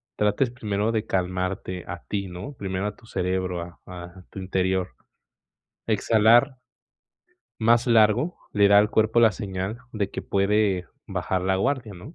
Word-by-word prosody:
trates 105 +5 +1
primero 110 -2 -2
de 110 -1 -1
calmarte 90 0 -2
a 90 -1 -7
ti, 100 -2 -2
¿no?, 90 +9 -8
primero 95 -4 -3
a 105 - -5
tu 115 - -20
cerebro, 90 -3 -2
a 85 0 -9
a 90 0 -10
tu - - -9
interior, 95 0 -1 0.9
exhalar 115 +5 +4 1.0
más 115 +2 +4
largo, 115 +7 +3 0.2
le 100 -1 +4
da 100 - +6
al 105 +1 +3
cuerpo 110 +1 +2
la 115 -2 +6
señal 95 +1 -4
de 100 -3 -2
que - - -5
puede 100 -2 +1 0.2
bajar 95 - -2
la 95 +1 +1
guardia, 120 0 -1
¿no?, 110 - -11
100 Hz, 155 wpm, -25 LUFS, 95-110 Hz, 1.0 s, da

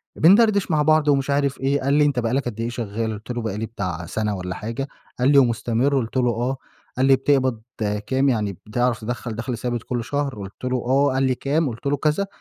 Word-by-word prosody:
بندردش 200 +2 +5
مع 155 -1 +3
بعض 155 0 +3
ومش 140 -1 +2
عارف 140 -1 +1
إيه، 140 +2 +1
قال 140 +1 +1
لي: 150 0 +4
"أنت 140 -4 +1
بقى 115 0 -1
لَك 135 +1 0
قد 115 -3 -5
إيه 115 +1 -1
شغّال؟" 115 -2 -3
قُلت 110 +3 -7
له: 120 -1 -3
"بقى 110 -3 -3
لي 110 - -2
بتاع 90 -6 -4
سنة 105 +4 -2
والّا 90 -1 -5
حاجة." 115 +5 -4 0.3
قال 130 +3 +4
لي: 145 - +5
"ومُستمِر؟" 120 +1 +2
قُلت 120 0 -2
له: 125 -1 +3
"آه." 120 +4 -2 0.4
قال 130 - +3
لي: 135 0 +6
"بتقبض 130 -3 +1 0.5
كام؟ 135 +1 +2
يعني 105 -6 -1
بتعرف 120 +1 0
تدخَّل 120 0 -4
دخل 120 +2 -4
ثابت 120 0 -3
كل 120 -2 -3
شهر؟" 140 +1 -2
قُلت 100 +1 -10
له: 125 0 0
"آه." 135 +3 +3
قال 135 +1 +1
لي: 130 -1 +2
"كام؟" 145 +3 0
قُلت 115 +4 -9
له 145 +1 +1
كذا، 155 +7 0
125 Hz, 230 wpm, -22 LUFS, 115-140 Hz, 0.5 s, لي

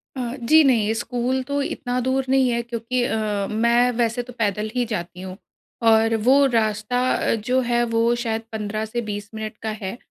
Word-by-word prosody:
अ, 245 -1 -3
जी, 310 +7 +6
नहीं, 225 -6 +3
स्कूल 245 +2 -1
तो 285 +2 -2
इतना 250 -2 -2
दूर 265 0 +1
नहीं 265 -1 +3
है, 235 0 0
क्योंकि 235 +1 -2
अ, 210 -3 -1
मैं 235 +3 +3
वैसे 235 +1 0
तो 250 +1 -12
पैदल 210 0 0
ही 250 - +2
जाती 180 -5 -5
हूँ, 185 0 -8 0.4
और 225 0 +4
वो 275 +2 +6
रास्ता 225 -1 0
अ, - - +1
जो 250 +4 0
है, 240 -1 +1
वो 230 0 +2
शायद 225 -1 -2
15 215 0 -3
से 235 +2 -3
20 205 0 -5
मिनट 215 0 -6
का 220 - -3
है। 190 +4 -4
235 Hz, 190 wpm, -22 LUFS, 215-250 Hz, 0.4 s, जी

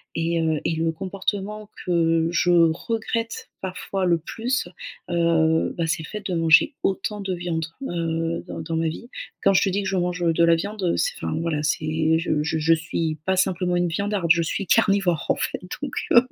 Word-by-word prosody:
Et 165 0 0
heu 160 -2 +1
et 165 - +1
le 160 0 0
comportement 200 +4 -4 0.2
que 165 -2 +2
je 175 +1 +2
regrette 225 +7 0
parfois 190 0 -3
le 170 -2 +3
plus, 230 +8 -2 0.4
heu, 165 -2 +2
bah, 165 - 0
c'est 160 0 -1
le - - -9
fait 210 -1 -7
de 185 - -2
manger 165 - +5
autant 200 +2 -1
de 190 -1 -2
viande, 170 -2 -2 0.2
heu, 165 -1 -2
dans - - -6
dans 165 +1 -4
ma 165 0 +1
vie. 235 +9 -8 0.3
Quand 195 - +5
je 190 - +4
te 195 - +2
dis 200 +2 -1
que - - -3
je 195 - -1
mange, 180 0 -1
heu, 165 -1 +3
de 170 - +3
la 170 0 +6
viande, 200 +3 -4
heu, 170 - +1
c'est - - +1
enfin, - - -1
voilà, 160 -3 -1
c'est 155 +2 +1
je 155 -3 0
je 160 +1 -1
je 165 +2 +4
suis 165 -1 -2
pas 190 0 +1
simplement 180 -1 +1
une 175 - +2
viandarde, 200 0 -1
je 170 +1 +5
suis 185 +4 -2
carnivore, 195 -6 +3
en - - +4
fait, - - -2 0.2
donc, 285 -3 -4 0.2
heu. 235 - +8
170 Hz, 210 wpm, -24 LUFS, 165-195 Hz, 0.4 s, heu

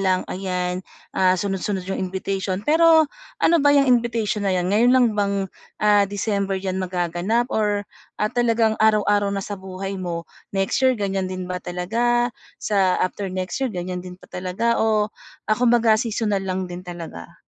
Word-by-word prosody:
lang 185 -1 +2
ayan, 180 -1 -2 0.3
ah, 185 -1 +3
sunod-sunod 195 0 -2
'yong 190 - -3
invitation. 190 +1 -2
Pero 320 +1 +6 0.4
ano 340 - +5
ba 285 0 +5
'yang 275 -2 +4
invitation 230 -4 +1
na 190 - +2
'yan 180 0 0
ngayon 240 +4 +5
lang 255 -2 +5
bang, 200 -1 +1 0.5
ah, 205 -1 +5
December 200 -1 -1
'yan 190 0 -3
magaganap 185 +6 -1
or 205 -1 +1 0.3
at 210 - 0
talagang 230 -2 +2
araw-araw 205 -2 +3
na 195 - -2
sa 205 -1 -6
buhay 190 +1 -6
mo? 170 -2 -3 0.3
Next 195 0 +1
year 260 -1 +4
ganyan 195 -2 -1
din 185 0 -5
ba 180 - -2
talaga 235 +8 0 0.3
sa 195 -3 +2
after 195 +2 -3
next 185 0 -3
year 265 - +1
ganyan 180 -2 -4
din 180 0 -9
pa - - -19
talaga 185 +6 -1
o 215 -1 +2 0.4
ah, 215 - +4
kumbaga 235 -3 +4
seasonal 215 -4 -1
lang 185 0 -1
din 175 0 -6
talaga? 170 - -8
200 Hz, 170 wpm, -22 LUFS, 185-225 Hz, 0.5 s, Pero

